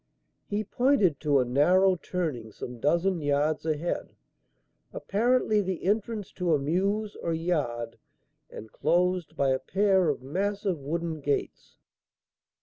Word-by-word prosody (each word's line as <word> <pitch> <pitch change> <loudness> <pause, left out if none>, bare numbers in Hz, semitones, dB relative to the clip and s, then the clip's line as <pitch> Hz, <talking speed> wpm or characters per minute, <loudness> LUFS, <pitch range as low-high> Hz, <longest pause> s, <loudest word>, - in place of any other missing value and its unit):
He 210 +1 -1
pointed 210 - +2
to 145 -3 +2
a 125 - +2
narrow 180 +9 +4
turning 155 -11 -4
some 120 +3 -8
dozen 170 +6 +1
yards 150 +2 0
ahead, 160 +2 -2 0.8
apparently 220 0 +1
the 185 -3 -4
entrance 210 +1 -1
to 175 -3 +1
a - - +2
mews 195 +9 -1
or 165 -1 -2
yard 135 -9 -2 0.5
and 110 - -10
closed 175 +1 0
by 140 -1 +2
a 130 0 +1
pair 190 -2 +2
of 140 -3 -2
massive 195 +4 -2
wooden 160 +3 -3
gates. 140 0 -3
170 Hz, 130 wpm, -27 LUFS, 145-195 Hz, 0.8 s, narrow